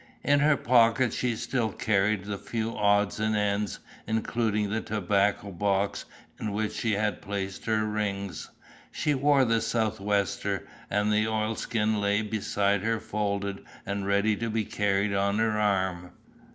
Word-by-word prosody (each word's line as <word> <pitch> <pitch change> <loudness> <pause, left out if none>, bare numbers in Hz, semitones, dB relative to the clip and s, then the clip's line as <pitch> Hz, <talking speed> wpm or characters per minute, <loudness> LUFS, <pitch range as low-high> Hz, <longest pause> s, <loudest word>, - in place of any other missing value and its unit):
In 145 0 +4
her 145 0 +4
pocket 120 +1 +3
she 125 -2 0
still 115 -1 -1
carried 100 -1 +1
the 100 -1 -4
few 115 0 -3
odds 100 0 +2
and 110 0 +1
ends 105 0 0 0.3
including 110 -2 0
the 110 +1 0
tobacco 100 0 0
box 100 +2 0 0.3
in 105 -2 -3
which 105 +1 -1
she 115 -2 -1
had 105 -2 -1
placed 100 -1 -4
her 110 -1 +1
rings. 100 -3 -3 0.4
She 150 - 0
wore 140 0 +4
the 115 -1 +2
sou'wester, 105 -3 -1 0.2
and 105 +1 +1
the 105 +1 +2
oilskin 110 0 0
lay 100 +1 +1
beside 100 -1 0
her 115 +1 0
folded 100 -2 -3 0.2
and 100 0 -3
ready 100 +2 +2
to 115 +1 -2
be 110 -1 -1
carried 100 0 0
on 100 +1 +1
her 110 0 +2
arm. 95 -4 0
105 Hz, 150 wpm, -27 LUFS, 100-110 Hz, 0.4 s, In